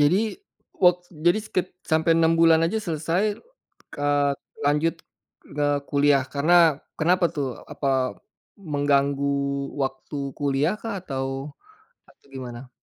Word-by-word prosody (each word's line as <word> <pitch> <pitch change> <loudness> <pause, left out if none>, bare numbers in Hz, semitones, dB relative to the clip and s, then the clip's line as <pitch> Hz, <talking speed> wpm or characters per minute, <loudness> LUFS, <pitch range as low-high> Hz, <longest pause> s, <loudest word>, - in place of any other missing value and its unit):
Jadi 145 +6 +4 0.6
wak 180 -1 +5 0.3
jadi 175 +4 +5
sekit— 185 -2 -2 0.2
sampai 160 +1 +3
6 165 0 +4
bulan 165 -1 +6
aja 220 +6 -1
selesai, 175 +4 -1 0.6
eee, 145 0 +2 0.3
lanjut 150 +3 +2 0.6
eee, 145 0 +1
kuliah 140 -1 +3
karena 150 +5 +3 0.4
kenapa 175 +3 +3
tuh 140 -3 -1 0.2
apa 135 -2 0 0.4
mengganggu 140 -3 +1 0.5
waktu 135 +2 -4 0.2
kuliah 145 +5 +1
kah 225 -2 -4
atau, 135 -2 -4 0.5
atau - - -24
gimana? 125 -1 -8
145 Hz, 110 wpm, -24 LUFS, 140-165 Hz, 0.6 s, bulan